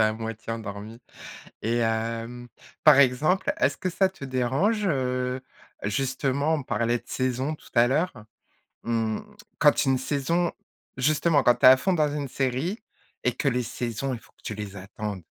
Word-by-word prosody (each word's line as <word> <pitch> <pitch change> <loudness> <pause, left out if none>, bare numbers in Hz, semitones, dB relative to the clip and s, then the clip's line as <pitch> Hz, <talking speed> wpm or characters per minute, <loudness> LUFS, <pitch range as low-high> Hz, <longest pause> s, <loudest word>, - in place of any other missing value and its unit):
à 110 0 +4
moitié 115 0 -6
endormi. 110 0 -7 0.6
Et 115 +2 0
hem, 115 +2 -2 0.4
par 150 -3 +8
exemple, 145 - +3
est-ce - - +1
que 185 - -2
ça 190 +2 +2
te 190 -7 -10
dérange, 135 - +1
heu, 125 -4 -1 0.4
justement, 135 +7 0
on 150 - -2
parlait 120 0 0
de - - -21
saisons 130 +3 -1
tout - - -16
à 120 0 +6
l'heure, 155 +8 +1 0.7
mmh, 115 -2 0 0.4
quand 150 -2 +4
une 130 -1 +3
saison 150 +6 0 0.5
justement 150 +3 +3
quand 120 - +5
tu 120 - +2
es - - +12
à 130 - +8
fond 190 +8 +1
dans 155 -3 +3
une 145 -2 -3
série 135 - -1 0.4
et 125 - +3
que 140 - -2
les 125 0 0
saisons, 120 +3 -3
il 120 - -5
faut - - -22
que - - -30
tu - - -4
les 105 -2 -7
attendes? 100 -1 -6
130 Hz, 170 wpm, -26 LUFS, 115-145 Hz, 0.7 s, es